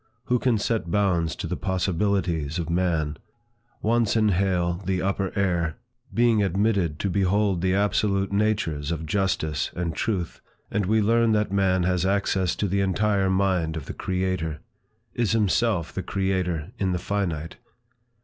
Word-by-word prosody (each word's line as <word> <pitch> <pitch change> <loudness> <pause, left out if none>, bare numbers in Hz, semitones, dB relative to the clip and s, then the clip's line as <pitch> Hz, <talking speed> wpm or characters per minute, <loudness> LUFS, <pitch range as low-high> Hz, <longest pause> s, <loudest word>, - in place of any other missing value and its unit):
Who 125 0 +1
can 120 -2 +2
set 105 -4 -1
bounds 90 -4 +1
to - - -5
the - - -2
possibilities 90 -4 -1
of 85 -1 -3
man? 85 -4 0 0.7
Once 115 0 +2
inhale 95 -4 +1
the 95 0 0
upper 95 0 -1
air, 85 -5 0 0.3
being 115 -2 +3
admitted 95 -4 +1
to 100 - 0
behold 100 -1 +1
the 95 0 +1
absolute 100 -1 +1
natures 100 -8 0
of 80 -1 -3
justice 80 -3 0
and 85 -2 -2
truth, 95 -7 -2 0.3
and 105 -3 0
we 110 +1 +3
learn 115 +1 +3
that 105 -1 +1
man 95 -2 +2
has 90 0 +1
access 95 -2 +1
to 105 - -1
the 100 +1 0
entire 100 0 +1
mind 95 -4 +1
of 75 - -6
the - - -6
Creator, 90 -4 -2 0.5
is 115 -4 0
himself 105 -5 +1
the 95 - -3
creator 95 -5 -1
in 95 -2 +1
the - - 0
finite. 90 -4 -3
95 Hz, 150 wpm, -25 LUFS, 85-100 Hz, 0.7 s, being